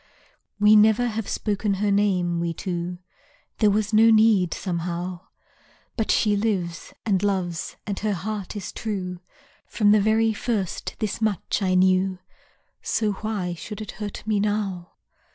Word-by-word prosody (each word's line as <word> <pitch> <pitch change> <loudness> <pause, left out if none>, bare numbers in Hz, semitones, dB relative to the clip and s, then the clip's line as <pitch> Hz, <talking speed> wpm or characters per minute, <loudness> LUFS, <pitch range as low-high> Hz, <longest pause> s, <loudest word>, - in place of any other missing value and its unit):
We 210 +1 +6
never 220 +3 +5
have 225 -3 -3
spoken 205 -1 -1
her 205 +1 0
name, 185 -4 +1
we 170 -1 -2
two; 175 0 -4 0.6
There 215 - +5
was 210 +1 0
no 225 +1 +6
need 215 -5 +4
somehow, 175 0 -4 0.7
But 220 -3 -2
she 210 -2 +3
lives, 190 -6 -2
and 195 -4 +2
loves, 185 -5 -2
and 200 -2 -3
her 215 -1 0
heart 200 +2 -5
is 200 -3 -5
true; 185 -5 -4 0.5
From 205 -2 +3
the 210 -1 +5
very 220 +2 +3
first 210 -4 -3
this 215 +1 -3
much 210 -1 0
I 185 -1 +1
knew, 185 0 +3 0.6
So 215 -2 0
why 200 -3 -3
should 205 +5 -8
it 215 - -6
hurt 205 -1 -5
me 215 -2 +1
now. 200 -4 -2
205 Hz, 150 wpm, -24 LUFS, 185-215 Hz, 0.7 s, We